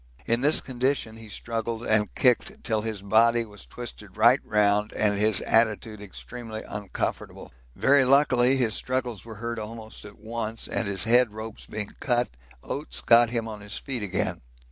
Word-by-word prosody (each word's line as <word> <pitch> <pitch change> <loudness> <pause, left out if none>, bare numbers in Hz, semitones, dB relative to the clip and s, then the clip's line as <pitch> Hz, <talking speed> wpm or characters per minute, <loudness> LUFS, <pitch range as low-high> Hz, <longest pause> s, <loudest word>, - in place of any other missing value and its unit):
In 115 +1 +1
this 150 +3 +3
condition 130 -3 -1
he 110 -1 -11
struggled 115 +1 -4
and 105 -1 +1
kicked 195 - +2
till 110 -3 0
his 110 -3 -4
body 115 +3 +4
was 105 -2 -12
twisted 105 -5 -9
right 120 +5 +6
round 105 0 +2
and 105 -1 +1
his 105 -1 +2
attitude 110 -1 +1
extremely 110 +3 -8
uncomfortable. 105 -2 -5 0.2
Very 140 0 +4
luckily 130 -1 +4
his 120 -5 +1
struggles 125 -6 -2
were 115 -1 -9
heard 115 +1 -4
almost 110 0 -8
at 105 0 -12
once, 110 +1 -4
and 115 - -2
his 95 -2 0
head 120 0 +4
ropes 110 0 -8
being 105 -1 -5
cut, 120 -2 +1 0.3
Oates 145 - -4
got 120 0 +5
him 115 -1 -2
on 105 -2 -7
his 105 0 -7
feet 130 -4 -4
again. 95 -2 -2
115 Hz, 165 wpm, -26 LUFS, 105-120 Hz, 0.3 s, right